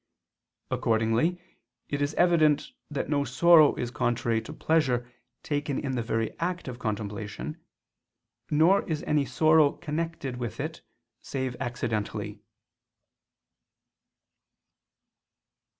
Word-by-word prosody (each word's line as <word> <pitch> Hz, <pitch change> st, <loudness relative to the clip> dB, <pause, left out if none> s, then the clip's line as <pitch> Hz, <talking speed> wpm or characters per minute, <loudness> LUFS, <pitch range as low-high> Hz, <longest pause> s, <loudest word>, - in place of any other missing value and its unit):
Accordingly 115 Hz, +10 st, +1 dB, 0.5 s
it 145 Hz, 0 st, -3 dB
is 145 Hz, +2 st, -1 dB
evident 155 Hz, -4 st, +3 dB, 0.2 s
that 145 Hz, -, -3 dB
no 145 Hz, -1 st, +1 dB
sorrow 155 Hz, +3 st, +6 dB
is 120 Hz, -, -3 dB
contrary 120 Hz, -2 st, 0 dB
to 125 Hz, -, -9 dB
pleasure 140 Hz, -6 st, +1 dB, 0.4 s
taken 145 Hz, -2 st, -2 dB
in 135 Hz, -, -2 dB
the 125 Hz, -2 st, -1 dB
very 115 Hz, 0 st, -2 dB
act 175 Hz, -1 st, -2 dB
of 125 Hz, -1 st, -6 dB
contemplation; 105 Hz, -, -4 dB, 0.9 s
nor 165 Hz, +7 st, +4 dB
is 155 Hz, -2 st, -2 dB
any 150 Hz, -2 st, +1 dB
sorrow 155 Hz, +3 st, +4 dB
connected 160 Hz, -5 st, -4 dB
with 120 Hz, -4 st, -5 dB
it -, -, -4 dB, 0.4 s
save 130 Hz, -2 st, -3 dB
accidentally. 120 Hz, -4 st, -3 dB
140 Hz, 105 wpm, -27 LUFS, 120-155 Hz, 0.9 s, sorrow